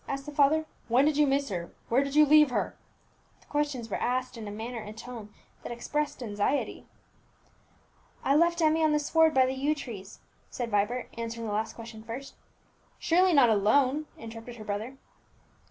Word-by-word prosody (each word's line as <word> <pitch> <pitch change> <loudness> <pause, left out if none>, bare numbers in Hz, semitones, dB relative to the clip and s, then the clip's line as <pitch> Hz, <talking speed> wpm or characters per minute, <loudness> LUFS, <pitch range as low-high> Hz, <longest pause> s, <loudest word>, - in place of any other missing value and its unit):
asked 275 0 -4
the 295 - -6
father; 295 +2 +3 0.2
"when 245 +4 +4
did 305 -1 +2
you 295 0 +4
miss 275 0 +1
her? 175 -3 -4 0.2
where 255 +4 +3
did 280 +1 -5
you 305 0 +7
leave 300 0 +6
her?" 245 - -2 0.6
The - - -25
questions 290 -5 -2
were 210 - -4
asked 255 +1 -1
in 225 -2 -7
a - - -5
manner 225 +3 -5
and 215 0 -9
tone 225 -3 -9 0.3
that - - -7
expressed 285 +3 -3
anxiety. 210 +5 -2 1.4
"I 275 - +3
left 340 +2 +3
Emmie 315 +1 +3
on 310 -1 +3
the 300 - +3
sward 320 +1 +3
by 260 -1 +6
the 260 - -1
yew 280 +3 0
trees," 215 -9 -8 0.3
said 240 -2 -4
Vibert, 210 +5 0
answering 230 0 -4
the 210 - -3
last 220 +2 -2
question 225 -1 -10
first. 235 +5 -7 0.6
"Surely 360 +2 +3
not 275 -7 +6
alone?" 260 +8 +2
interrupted 225 +1 -9
his 215 -2 -10
brother. 215 +6 -4
255 Hz, 185 wpm, -28 LUFS, 225-295 Hz, 1.4 s, you